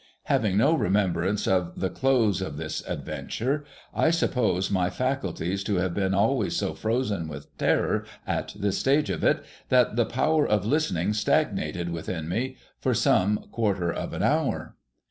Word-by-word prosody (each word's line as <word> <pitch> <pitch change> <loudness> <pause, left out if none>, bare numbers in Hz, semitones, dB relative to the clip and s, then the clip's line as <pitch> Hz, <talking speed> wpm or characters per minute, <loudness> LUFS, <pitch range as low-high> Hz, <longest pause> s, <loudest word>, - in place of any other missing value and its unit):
Having 100 -3 +1
no 115 +9 +4
re 160 - +1
membrance 95 0 +1
of 90 -2 0
the 95 - -1
close 120 -8 +2
of 85 -6 -4
this 80 0 -4
adventure, 140 +5 -3 0.3
I 160 - +3
suppose 120 - +1
my 90 -2 +2
faculties 100 -8 -2
to 100 - 0
have 90 -1 0
been 95 0 0
always 110 +2 +2
so - - -1
frozen 110 -7 -1
with 75 -2 -9
terror - - +1 0.2
at - - -3
this 100 -1 0
stage 135 -5 +2
of 85 - -3
it, - - +2 0.2
that 125 -3 +3
the 120 - +4
power 150 +6 +2
of 105 -2 +1
listening 105 - +1
stagnated 90 -4 0
within 80 -1 -4
me 125 +9 -2 0.2
for - - +1
some 105 +3 +2
quarter 100 -7 0
of - - -4
an - - -2
hour. - - 0
100 Hz, 165 wpm, -26 LUFS, 90-125 Hz, 0.3 s, no